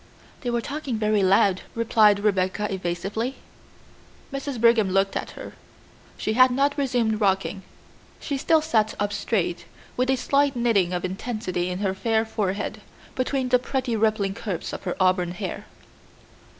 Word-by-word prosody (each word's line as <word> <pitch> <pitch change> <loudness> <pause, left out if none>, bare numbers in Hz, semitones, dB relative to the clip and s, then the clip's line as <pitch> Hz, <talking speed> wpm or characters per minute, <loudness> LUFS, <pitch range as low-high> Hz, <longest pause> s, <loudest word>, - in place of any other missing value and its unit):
"They 245 - -3
were 240 0 0
talking 280 -3 -4
very 215 -1 +2
loud," 190 0 +3
replied 215 -3 +4
Rebecca 200 0 0
evasively. 195 +7 -3 1.0
Mrs. 275 -2 -4
Brigham 230 -3 +4
looked 195 +1 +1
at - - -5
her. - - -8 0.6
She 215 - -1
had 255 +2 +6
not 275 +3 +1
resumed 245 -6 0
rocking. 195 0 +1 0.6
She 285 - -3
still 310 +3 +2
sat 220 -9 +1
up 205 0 -1
straight, 185 -6 -1 0.3
with 255 +1 0
a 265 - +4
slight 280 +2 +2
knitting 225 -7 +2
of 180 0 -2
intensity 185 -2 -3
on 180 - -3
her 190 - +1
fair 220 +3 0
forehead, 205 -2 -3 0.3
between 255 0 -1
the 250 0 +4
pretty 255 -1 -2
rippling 215 -3 +1
curves 195 -4 -5
of - - -7
her 180 - -2
auburn 185 -2 +2
hair. 175 - -6
215 Hz, 150 wpm, -24 LUFS, 190-250 Hz, 1.0 s, had